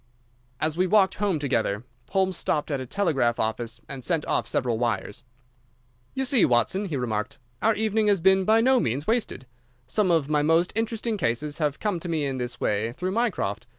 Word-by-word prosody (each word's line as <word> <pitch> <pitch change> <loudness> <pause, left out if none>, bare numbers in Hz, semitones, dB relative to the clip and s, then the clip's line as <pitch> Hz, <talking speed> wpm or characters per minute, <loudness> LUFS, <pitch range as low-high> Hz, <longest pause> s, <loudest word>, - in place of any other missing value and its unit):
As 155 0 -1
we 185 +2 +1
walked 195 0 +4
home 200 -5 +1
together, 115 -7 -1 0.3
Holmes 190 -1 +1
stopped 150 -1 -1
at 140 - -1
a 130 - -6
telegraph 135 -10 0
office 110 +1 -2
and 135 -2 -7
sent 165 0 0
off - - 0
several 120 -3 0
wires. 110 -4 -2 0.9
"You 265 - -1
see, 255 -5 +4
Watson," 125 - +2
he 160 -7 -3
remarked, 120 +2 -3 0.2
"our 225 0 +3
evening 220 0 +1
has 200 -2 +3
been 190 +2 +4
by 220 +3 +4
no 260 +2 +4
means 135 - -1
wasted. 220 - -1 0.4
Some 185 - 0
of 165 -5 +2
my 150 -1 +2
most 165 +4 +2
interesting 225 0 -1
cases 145 - -2
have 150 -2 -1
come 205 -5 -1
to 175 - -6
me 155 -3 0
in 135 -2 -3
this 120 0 -5
way 110 +3 -1
through 180 +6 -3
Mycroft. 200 - -1
155 Hz, 190 wpm, -25 LUFS, 125-200 Hz, 0.9 s, walked